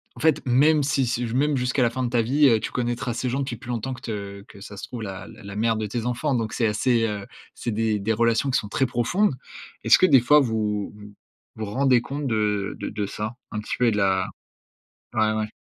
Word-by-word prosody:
en - - -12
fait 160 -2 +3
même 145 +4 +4
si 135 -1 +1
si 120 0 -1
j 115 - -5
même 145 +2 +2
jusqu'à 125 +2 0
la 120 - +3
fin 130 +2 -3
de - - -1
ta 120 -1 +2
vie, 140 +6 +4
heu, 115 -4 +4
tu - - -4
connaîtras 120 0 -2
ces 125 +2 -2
gens 130 +3 -1
depuis 130 -4 -3
plus 120 - -12
longtemps 120 +2 -3
que 125 - -10
te, 100 -3 -6
que 100 -1 -15
ça 100 0 -9
se - - -8
trouve 120 - -7
la 95 -2 -6
la 110 -1 -13
la 100 0 -8
mère 115 +1 +2
de 110 0 -2
tes 115 +2 -3
enfants, 125 +4 -1
donc 115 -3 -1
c'est 115 - +1
assez, 115 +2 +2
heu, 105 -3 -4 0.3
c'est 120 - -3
des 110 -1 0
des 110 +3 0
relations 115 +4 +2
qui 130 - +3
sont 105 - -7
très 135 - +1
profondes. 130 - +1 0.5
Est-ce - - +7
que - - +5
des 135 -8 +6
fois 150 +5 +6
vous 110 -5 -1
vous 105 0 -12 0.4
vous 110 - -3
rendez 125 +4 +3
compte 140 +3 -4
de 105 -3 0
de - - -4
de 105 -1 -3
ça? 105 +3 -5 0.2
Un 105 - -3
petit 105 - -4
peu 125 - +3
et - - +4
de 105 - -1
la 95 -2 +2 0.9
ouais, 110 -1 +3
ouais. 110 0 -2
115 Hz, 255 wpm, -24 LUFS, 105-130 Hz, 0.9 s, Est-ce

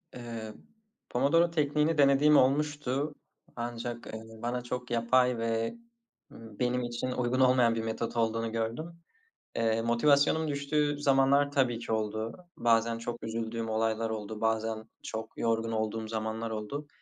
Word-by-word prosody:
Eee, 115 -3 -6 0.6
Pomodoro 165 +7 +3
tekniğini 150 0 +1
denediğim 145 +1 +6
olmuştu, 145 +1 +1 0.4
ancak, 120 0 -5
eee, 110 0 -7 0.2
bana 120 +1 -2
çok 125 0 -5
yapay 125 +1 +3
ve, 115 - -1 0.6
ımm, 110 -2 -13
benim 125 0 +1
için 120 +1 -3
uygun 125 0 0
olmayan 125 -3 +4
bir 115 - -2
metot 115 +1 -3
olduğunu 115 0 0
gördüm. 115 +9 -3 0.6
Eee, 115 0 +1
motivasyonum 140 +6 +3
düştüğü 145 +1 0
zamanlar 140 0 +4
tabii 125 -4 +1
ki 115 - -6
oldu. 110 +1 -2 0.2
Bazen 115 0 +2
çok 120 +1 -6
üzüldüğüm 115 0 -3
olaylar 110 0 0
oldu, 110 -1 -5
bazen 110 0 0 0.2
çok 110 0 -6
yorgun 115 0 0
olduğum 110 0 -2
zamanlar 110 +1 -3
oldu. 110 +8 -5
120 Hz, 135 wpm, -30 LUFS, 115-135 Hz, 0.6 s, denediğim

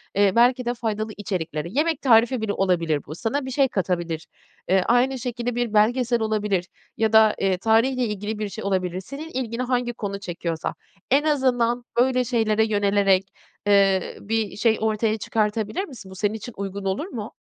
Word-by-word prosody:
eee, 200 -1 +4
belki 250 +1 +4
de, 240 - 0
faydalı 220 -2 -3
içeriklere, 170 -6 -3
yemek 300 +4 0
tarifi 235 -1 +4
bile 205 -2 -1
olabilir 170 -6 +1
bu, 155 - -7
sana 260 - -2
bir 260 - -5
şey 270 +1 +3
katabilir. 175 -6 -2 0.4
Eee, 190 0 +4
aynı 250 +2 +2
şekilde 245 0 -3
bir 240 -3 -1
belgesel 235 +2 +2
olabilir 210 -4 0 0.3
ya 220 0 +1
da, 220 -1 +6
eee, 190 -1 +1
tarihle 230 +5 +2
ilgili 210 0 -4
bir 210 -1 -2
şey 220 - -7
olabilir. 185 -2 -1
Senin 285 +10 -8
ilgini 250 -3 -3
hangi 245 -1 -1
konu 200 -3 -5
çekiyorsa. 170 -3 -4 0.4
En 285 +2 +4
azından 245 -5 +1
öyle 255 0 +3
şeylere 220 -3 +1
yönelerek, 200 -2 +2 0.4
eee, 195 -2 +3
bir 220 0 -2
şey 220 +1 +3
ortaya 220 0 +1
çıkartabilir 215 - -1
misin? 220 - -12
Bu - - -10
senin 205 +2 0
için 220 +2 -7
uygun 195 0 -5
olur 195 - -1
mu? 225 - -7
220 Hz, 170 wpm, -23 LUFS, 195-245 Hz, 0.4 s, da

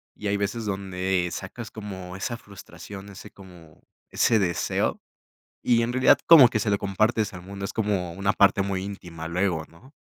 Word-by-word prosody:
y 105 - -5
hay 100 0 +1
veces 105 +3 -2
donde 95 -2 -1
sacas 110 +5 -7
como 95 -4 -8
esa 115 +4 -4
frustración, 100 -1 -11
ese 95 - -11
como, 90 -5 -16 0.3
ese 115 -2 +3
deseo 90 -4 -1 0.6
y 115 -1 +3
en 115 - -1
realidad, 130 0 +5
como 155 -7 +10
que 110 - -1
se 105 - -1
lo 100 - +2
compartes 110 +2 0
al 90 - -8
mundo, 100 +2 -7
es - - -6
como 100 -6 -1
una 100 +3 0
parte 100 0 +4
muy 95 -1 -2
íntima, 90 -5 -7
luego, 85 -2 -1
¿no? 120 +12 -19
100 Hz, 180 wpm, -25 LUFS, 90-105 Hz, 0.6 s, como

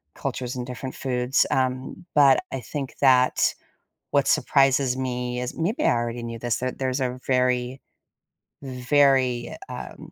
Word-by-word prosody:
cultures 125 0 -4
and 125 -1 -5
different 130 +1 -6
foods, 125 +1 +1
um, 130 +6 -2
but 140 -3 +6
I 135 - -3
think 135 +2 -6
that 130 -2 +4 0.6
what - - +2
surprises 135 -1 +3
me 125 -1 -3
is- 125 - -5
maybe 180 +8 -1
I - - +4
already 120 0 -3
knew 115 -1 -6
this- 120 -2 -1
that 130 0 -4
there's 130 0 -1
a 125 0 -2
very, 125 0 0 0.8
very, 130 -1 +1
um, - - -8
130 Hz, 140 wpm, -24 LUFS, 125-135 Hz, 0.8 s, but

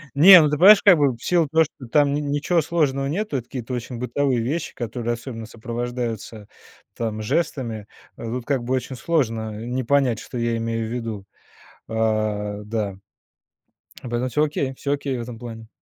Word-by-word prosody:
Не, 180 +4 +10
ну 150 - +3
ты 150 - 0
понимаешь, 200 +4 +8
как 190 -4 +7
бы, 140 -4 +3
в 115 - -16
силу 170 -3 +2
того, 160 +3 +4
что 145 -4 -10
там 145 +3 +3
н 145 0 -1
ничего 155 +4 +1
сложного 145 -4 0
нету, 160 0 -2
это 120 - -5
какие-то 125 -1 -6
очень 125 0 -5
бытовые 125 +1 0
вещи, 150 +8 -3
которые 120 0 -3
особенно 115 -1 -7
сопровождаются 115 -2 -5 0.5
там 110 -2 -3
жестами, 115 -5 -2 0.3
э, - - -9
тут, 120 +1 -4
как 135 -4 0
бы, 125 +2 -2
очень 130 0 -4
сложно 115 -9 -1
не 125 +1 -2
понять, 135 -4 +2
что 125 - -8
я 115 -1 0
имею 115 -1 -2
в - - -7
виду. 115 -5 -5 0.6
Э, 110 -2 -1
да. 105 -3 -3 1.1
Поэтому 120 +2 -1
всё, 150 +4 +1
окей, 140 -3 -1
всё 140 +2 -2
окей 140 -2 -2
в - - -4
этом 115 -1 -7
плане. 115 -2 -9
125 Hz, 180 wpm, -23 LUFS, 115-145 Hz, 1.1 s, Не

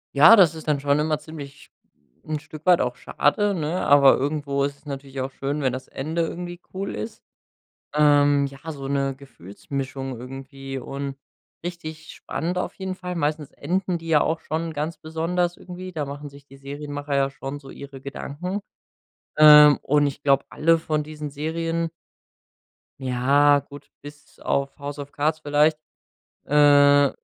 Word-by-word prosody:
Ja, 150 +11 +9
das 175 -7 +5
ist 160 - -10
dann 150 -2 +2
schon 140 +1 +2
immer 155 0 0
ziemlich 145 -2 -11 0.5
'n 155 -1 -3
Stück 155 +2 -12
weit 180 -2 +5
auch 125 0 -1
schade, 200 +11 +1
ne, 165 0 -2
aber 140 -1 +7
irgendwo 140 0 -1
ist 140 0 -2
es 145 - -31
natürlich 135 -1 -6
auch 130 +1 -3
schön, 140 +3 -3
wenn 130 -2 +1
das 130 - -6
Ende 160 +5 -2
irgendwie 175 +1 -6
cool 195 +1 -4
ist. 105 +1 -6 0.7
Ähm, 145 -1 +4
ja, 140 +3 -9
so 135 -2 -7
'ne 135 -1 0
Gefühlsmischung 135 +2 -6
irgendwie 135 +1 -7
und 140 +1 -5 0.5
richtig 160 -3 -7
spannend 175 +3 -4
auf - - -2
jeden 190 -1 -4
Fall. 180 -1 -6
Meistens 150 -2 -1
enden 180 +3 -2
die 165 0 -10
ja 155 -2 +4
auch 160 0 -1
schon 165 +1 -3
ganz 155 +2 -3
besonders 170 +2 -2
irgendwie. 185 0 -8
Da 150 -4 -3
machen 145 +1 -7
sich 140 0 -16
die 135 - -15
Serienmacher 145 +1 -5
ja 135 0 +2
schon 135 +1 -7
so 135 - -13
ihre 140 0 -10
Gedanken. 145 +8 -5 0.8
Ähm, 150 -1 +9
und 145 +1 +2
ich 140 0 -5
glaube, 140 -1 +3
alle 165 +2 +3
von 155 -2 -1
diesen 150 -1 -7
Serien 165 +3 -2 1.1
ja 140 +3 +4
gut, 140 0 -13
bis 145 0 -14
auf 140 0 -1
„House 145 +1 -6
of 145 0 -8
Cards” 155 +2 0
vielleicht 150 +1 +2 0.7
äh, 145 -1 +6
145 Hz, 165 wpm, -24 LUFS, 140-160 Hz, 1.1 s, Ja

